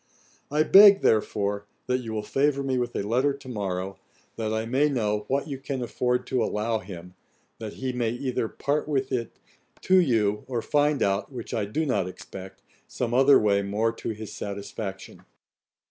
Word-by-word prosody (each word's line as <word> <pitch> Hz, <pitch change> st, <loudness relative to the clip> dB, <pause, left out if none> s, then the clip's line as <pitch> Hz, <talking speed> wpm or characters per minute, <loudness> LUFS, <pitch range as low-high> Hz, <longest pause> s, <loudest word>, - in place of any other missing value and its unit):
I 150 Hz, +2 st, +2 dB
beg, 200 Hz, +3 st, +8 dB
therefore, 105 Hz, -1 st, +1 dB, 0.2 s
that 125 Hz, 0 st, 0 dB
you 115 Hz, -3 st, -6 dB
will 110 Hz, -1 st, -3 dB
favour 140 Hz, +4 st, +1 dB
me 130 Hz, -2 st, 0 dB
with 120 Hz, -1 st, -3 dB
a -, -, -1 dB
letter 125 Hz, +7 st, +1 dB
to 140 Hz, -1 st, -14 dB
morrow, 95 Hz, -4 st, -4 dB, 0.4 s
that 110 Hz, -1 st, -2 dB
I 110 Hz, 0 st, -1 dB
may 135 Hz, +6 st, +2 dB
know 105 Hz, -6 st, -1 dB
what 140 Hz, +3 st, 0 dB
you 140 Hz, -3 st, -5 dB
can 135 Hz, -2 st, -4 dB
afford 125 Hz, +1 st, -1 dB
to 125 Hz, -3 st, 0 dB
allow 110 Hz, +1 st, -1 dB
him, 90 Hz, -2 st, -10 dB, 0.5 s
that 110 Hz, -2 st, -6 dB
he 130 Hz, -1 st, -4 dB
may 120 Hz, -2 st, 0 dB
either 125 Hz, -1 st, -2 dB
part 145 Hz, +6 st, -2 dB
with 135 Hz, -3 st, -1 dB
it 120 Hz, -3 st, -3 dB, 0.4 s
to 185 Hz, -, +4 dB
you, 110 Hz, -, +1 dB
or 120 Hz, -3 st, -2 dB
find 145 Hz, -1 st, +2 dB
out, 100 Hz, +6 st, 0 dB
(which 120 Hz, -4 st, -7 dB
I 110 Hz, -3 st, 0 dB
do 155 Hz, +11 st, -2 dB
not 100 Hz, -10 st, 0 dB
expect,) 95 Hz, +1 st, -10 dB, 0.2 s
some 120 Hz, -1 st, -3 dB
other 135 Hz, +2 st, +6 dB
way 100 Hz, -1 st, +2 dB
more 105 Hz, +3 st, 0 dB
to -, -, -6 dB
his 110 Hz, -1 st, -6 dB
satisfaction. 100 Hz, -2 st, -6 dB
115 Hz, 180 wpm, -26 LUFS, 105-135 Hz, 0.5 s, beg